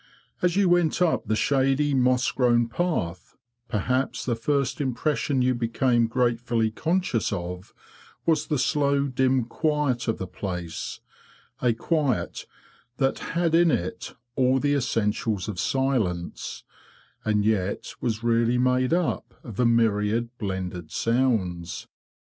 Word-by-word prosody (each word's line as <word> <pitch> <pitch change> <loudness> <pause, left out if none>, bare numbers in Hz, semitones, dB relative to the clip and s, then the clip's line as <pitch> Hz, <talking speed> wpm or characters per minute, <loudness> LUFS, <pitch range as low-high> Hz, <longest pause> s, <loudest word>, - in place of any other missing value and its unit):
As 180 -1 +2
you 200 -1 +4
went 175 -2 +3
up 180 -3 +1
the 110 - +1
shady 135 +3 +2
moss 125 -1 +2
grown 120 -2 +3
path, 115 - -3 0.3
perhaps 125 +5 -1
the 125 - 0
first 140 +5 0
impression 130 0 0
you 130 0 +3
became 120 0 +1
gratefully 120 -2 +1
conscious 165 - 0
of 90 0 -5 0.5
was 160 -2 +2
the 150 - 0
slow 140 +1 +2
dim 130 -1 +1
quiet 145 -2 0
of 115 - 0
the 95 - -4
place—a 90 +6 -5
quiet 140 +1 -1 0.5
that 135 -1 +1 0.2
had 170 -2 +2
in 170 0 +5
it 90 - -2 0.2
all 130 0 +3
the 145 +1 +1
essentials 110 -6 0
of 100 -4 -4
silence, 115 -12 -1 0.6
and 105 -1 +1
yet 100 -3 -1
was 115 -2 -2
really 115 +1 +2
made 125 +2 +2
up 175 -1 -2
of 115 -4 -9
a 125 - +4
myriad 115 +1 +1
blended 95 -5 -4
sounds. 100 -9 0
125 Hz, 125 wpm, -25 LUFS, 110-140 Hz, 0.6 s, in